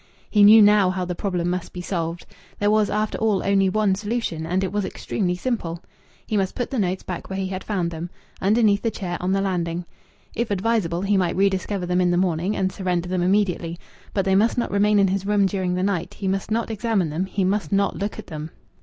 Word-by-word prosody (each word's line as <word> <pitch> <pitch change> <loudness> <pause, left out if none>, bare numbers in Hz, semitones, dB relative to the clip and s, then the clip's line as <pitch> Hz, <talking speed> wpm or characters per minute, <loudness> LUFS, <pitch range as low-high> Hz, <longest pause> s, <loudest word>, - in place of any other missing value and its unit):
He 210 - +4
knew 210 +1 +9
now 205 -2 +5
how 185 0 -2
the 180 - -3
problem 175 -1 -2
must 180 -1 -4
be 180 - -6
solved. 170 -2 -3 0.3
There 205 0 +2
was, 215 -1 +3
after 215 0 -1
all, 215 -3 +1
only 195 -1 +3
one 210 0 +2
solution, 205 -5 -3
and 185 +3 0
it 190 - -2
was 205 0 -1
extremely 180 -1 -2
simple. 180 -6 -3 0.4
He 215 - -1
must 195 -1 -1
put 245 +1 -3
the 265 - -1
notes 185 -2 -1
back 180 - -6
where 190 - -4
he 190 -1 -2
had 190 0 -5
found 180 -5 -1
them, 165 +1 -5 0.3
underneath 205 0 +3
the 230 - 0
chair 185 -5 -4
on 180 +1 0
the 195 0 +2
landing. 175 -3 -2 0.5
If 235 0 -2
advisable, 195 -4 0
he 200 0 +2
might 180 -2 +1
rediscover 195 0 0
them 180 +1 +1
in 180 - +3
the 175 - +2
morning 180 +2 0
and 190 0 0
surrender 180 -2 -2
them 185 -1 0
immediately. 180 -3 +1 0.3
But 195 -2 0
they 190 - +2
must 215 +6 +3
not 240 - -1
remain 205 +1 +3
in 195 -1 +4
his 195 +1 -2
room 205 -1 +3
during 185 -2 -1
the 180 - -1
night. 195 -4 -1
He 195 - -4
must 195 +2 -1
not 225 +1 -1
examine 215 -6 0
them 175 +5 -2
he 195 0 -1
must 200 +3 0
not 200 0 +2
look 205 +1 -4
at - - -8
them. 155 -1 -6
190 Hz, 235 wpm, -23 LUFS, 180-205 Hz, 0.5 s, knew